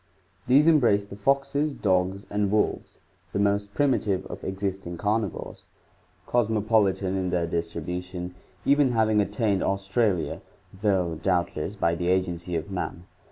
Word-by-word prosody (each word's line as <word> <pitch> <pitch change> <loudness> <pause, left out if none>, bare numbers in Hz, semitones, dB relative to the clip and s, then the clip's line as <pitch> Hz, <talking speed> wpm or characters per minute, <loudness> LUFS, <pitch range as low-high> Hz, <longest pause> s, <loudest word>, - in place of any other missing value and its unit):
— 95 0 -36
These 135 +4 +6
embrace 120 -11 +4
the 100 - -10
foxes, 140 +6 +1
dogs 95 0 0
and 105 -1 +1
wolves, 105 +1 0 0.4
the - - -1
most 100 0 0
prim 145 -1 +3
itive 100 -6 0
of - - -8
existing 95 -2 -4
carnivores, 105 0 -2 0.6
cosmopolitan 105 -4 +1
in 95 -1 -1
their 90 -1 0
distribution, 90 +2 -4 0.3
even 140 -2 +4
having 110 -2 +3
attained 100 0 0
Australia, 95 -1 0 0.3
though 95 -5 0
doubtless 90 0 -1
by 85 -4 +1
the 85 +1 -2
agency 90 -1 0
of 100 - -3
man. 90 -2 -4
100 Hz, 135 wpm, -26 LUFS, 90-110 Hz, 0.6 s, These